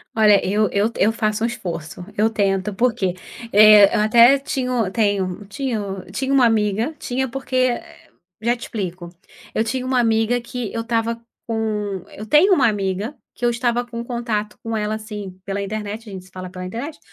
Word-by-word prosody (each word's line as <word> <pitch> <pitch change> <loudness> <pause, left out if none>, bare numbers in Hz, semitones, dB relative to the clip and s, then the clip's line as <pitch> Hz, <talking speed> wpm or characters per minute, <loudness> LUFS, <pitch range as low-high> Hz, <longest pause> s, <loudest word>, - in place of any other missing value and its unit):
Olha, 210 -3 +5
eu 210 +1 +2
eu 205 +2 +2
t 235 - -11
eu 215 - +4
faço 215 -1 -1
um - - +3
esforço. 175 -7 -6
Eu 215 +2 +3
tento, 200 -2 0
porque, 225 -5 +1 0.4
eh, 210 -1 +8
eu - - +3
até 235 +5 +6
tinha 260 -2 -2
o 230 -6 +1
tenho 200 -2 0
tinha 255 +1 -3 0.3
tinha 270 +5 -1
uma 260 -3 +5
amiga, 220 +5 +1
tinha 260 +2 -2
porque, 265 +1 -5
eh 255 -1 -1 0.3
já 235 +2 +2
te 235 - -16
explico. 180 -5 -5 0.4
Eu 220 - +1
tinha 250 +3 -2
uma 255 -1 +1
amiga 225 +1 +2
que 240 -1 -5
eu 230 - -2
estava 230 0 -1 0.3
com 210 -4 -2
eu 215 - -9
tenho 310 - +5
uma 275 -8 +4
amiga, 205 +4 -2 0.2
que 245 - -14
eu - - +4
estava 240 0 0
com 235 -1 -6
contato 235 -3 -3
com 225 0 -3
ela, 210 0 -1
assim, 210 -4 -8
pela 200 0 -3
internet, 215 +2 -5
a - - -9
gente 185 -1 -8
se 190 - -20
fala 185 0 -7
pela 185 0 -7
internet. 240 - -6
220 Hz, 195 wpm, -21 LUFS, 200-240 Hz, 0.4 s, eh